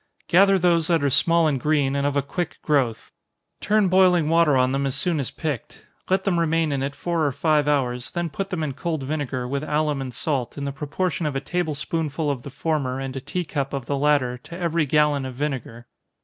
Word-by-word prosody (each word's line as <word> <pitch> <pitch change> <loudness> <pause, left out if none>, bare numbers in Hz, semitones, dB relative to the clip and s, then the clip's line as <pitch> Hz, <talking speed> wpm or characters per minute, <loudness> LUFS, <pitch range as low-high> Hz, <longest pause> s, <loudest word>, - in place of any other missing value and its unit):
_ - - -54
Gather 195 +2 +5
those 170 -3 +2
that 165 -4 +2
are 140 - +2
small 165 +5 +3
and 145 -4 +1
green, 145 -1 +1
and 140 0 +1
of 145 - -1
a 140 - +1
quick 175 +5 -4
growth. 130 -7 0 0.5
Turn 210 -1 +2
boiling 180 -4 +4
water 165 -4 +4
on 130 0 +3
them 135 +1 0
as 135 - -1
soon 165 +2 0
as 135 - -2
picked. 150 -8 -5 0.2
Let 190 +1 +2
them 180 -4 +1
remain 165 -1 +1
in 140 -1 -1
it 140 +1 -3
four 170 -2 -1
or 145 - +2
five 150 +1 +1
hours, 125 -4 0
then 175 -2 -3
put 195 +6 -4
them 175 -5 -2
in 145 -3 -2
cold 160 0 -3
vinegar, 135 -3 -3
with 140 +3 -2
alum 150 -2 0
and 130 -1 -5
salt, 130 0 -2
in 140 - -3
the 140 - -2
proportion 155 +4 -2
of 145 - -3
a - - +1
table 160 +2 -2
spoonful 150 0 -2
of 135 -3 -4
the 140 - -8
former 140 -2 -2
and 135 0 -5
a 135 - -4
tea 175 +6 -3
cup 140 -3 -3
of 135 -3 -3
the 140 - -1
latter, 140 -4 +1
to 170 +7 -10
every 170 -3 0
gallon 150 -1 +2
of 130 -1 -6
vinegar. 130 -4 -4
150 Hz, 235 wpm, -23 LUFS, 135-165 Hz, 0.5 s, Gather